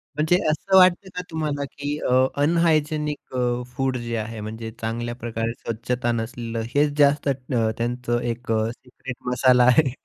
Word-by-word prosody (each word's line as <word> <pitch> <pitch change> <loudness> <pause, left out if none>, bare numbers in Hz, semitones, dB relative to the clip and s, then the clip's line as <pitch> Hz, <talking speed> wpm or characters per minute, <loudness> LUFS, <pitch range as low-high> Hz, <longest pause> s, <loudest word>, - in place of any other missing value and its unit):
म्हणजे 155 +4 +3
असं 190 +5 +2
वाटतं 185 +1 +5
का 180 - -2
तुम्हाला 150 -3 -2
की 145 +1 -4
अ, 125 - 0 0.3
अनहायजिनिक 155 -2 +1
अ, 125 - 0 0.3
फूड 135 -1 0
जे 115 0 -3
आहे 110 0 -5
म्हणजे 110 +1 -6
चांगल्याप्रकारे 115 0 -3
स्वच्छता 120 +1 -2
नसलेलं 115 0 -3
हेच 145 +1 +4
जास्त 145 0 +4
अ, - - +3 0.4
त्यांचं 120 0 -1
एक 120 0 -3
अ, 110 0 +1
सिक्रेट 125 0 -10
मसाला 125 0 +4
आहे. 130 +2 +5
125 Hz, 150 wpm, -23 LUFS, 115-150 Hz, 0.4 s, वाटतं